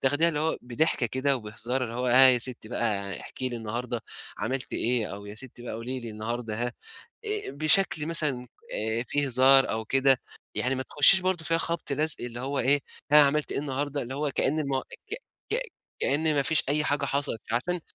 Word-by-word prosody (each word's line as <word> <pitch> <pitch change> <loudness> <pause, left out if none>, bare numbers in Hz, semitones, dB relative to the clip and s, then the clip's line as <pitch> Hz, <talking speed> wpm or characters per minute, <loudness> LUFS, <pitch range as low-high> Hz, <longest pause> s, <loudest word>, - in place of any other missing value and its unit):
تاخديها 145 +5 +3
اللي 150 -2 -2
هو 160 +1 -1
بضحكة 125 +1 0
كده 130 +4 +1
وبهزار 120 +3 -3
اللي 115 - -7
هو، 125 +1 -2
ها 130 +2 +7
ياستّي 125 -3 +1
بقى 100 -6 -1
احكي 130 - -3
لي 120 - -5
النهارده 115 +2 -4 0.4
عملتِ 130 -1 -3
إيه؟ 120 -2 +1
أو 100 +1 -8
يا 105 - -8
ستّي 120 +1 -10
بقى، 120 - -6
قولي 125 +3 -4
لي 115 -1 -7
النهارده 110 +1 -4
ها 120 - -4 0.5
آآ 425 -1 -2
بشكل 155 +1 +2
مثلًا 150 -7 +1 0.3
آآ 110 +2 0
فيه 145 +3 +1
هزار 135 +1 +6
أو 110 0 -2
كده، 135 +2 +3 0.3
يعني 125 +5 0
ما 130 - -3
تُخشّيش 150 +8 +5
برضه 185 -3 -1
فيها 165 0 +2
خَبْط 165 -3 -3
لَزْق 155 +2 +2
اللي 120 0 -6
هو 135 +2 -3
إيه، 140 +4 +3 0.3
ها، 150 - +9
عملتي 145 +1 +1
إيه - - -1
النهارده؟ 145 0 -3
اللي 125 +2 -6
هو 145 +1 -1
كإن 145 +4 +1
الم 135 -2 -1 0.3
ك - - -1 0.4
ك - - +1 0.4
كإن 155 +3 +2
ما 140 - +2
فيش 160 +3 +2
أي 150 +2 +2
حاجة 145 -2 0
حصلت، 140 -4 -1
عشان 175 +9 0
130 Hz, 195 wpm, -27 LUFS, 120-150 Hz, 0.5 s, ها